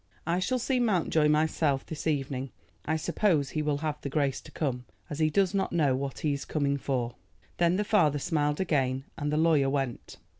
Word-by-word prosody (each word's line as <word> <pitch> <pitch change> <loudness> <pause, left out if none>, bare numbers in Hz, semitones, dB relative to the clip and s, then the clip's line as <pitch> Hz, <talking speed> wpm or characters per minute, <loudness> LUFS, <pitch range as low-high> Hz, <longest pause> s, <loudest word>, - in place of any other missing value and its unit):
I 170 +2 +1
shall 255 +7 0
see 255 +1 0
Mountjoy 175 -9 +2
myself 150 -2 +1
this 160 0 -5
evening. 135 -3 -1 0.4
I 160 - 0
suppose 155 -3 +1
he 155 - -1
will 150 -1 0
have 150 -1 -3
the 140 - -4
grace 140 -2 0
to - - -14
come, 125 -5 -2 0.3
as 145 - -4
he 155 -1 +3
does 190 +3 +2
not 195 -1 0
know 145 -6 +3
what 135 0 -4
he 150 -2 +1
is 140 - -4
coming 140 -2 0
for." 125 -3 -2 0.4
Then 170 0 +3
the 205 - +1
father 180 -9 +3
smiled 150 0 0
again, 135 -7 0
and 150 -2 -2
the 150 - +1
lawyer 155 -4 +3
went. 135 -4 -3
150 Hz, 200 wpm, -28 LUFS, 140-165 Hz, 0.4 s, he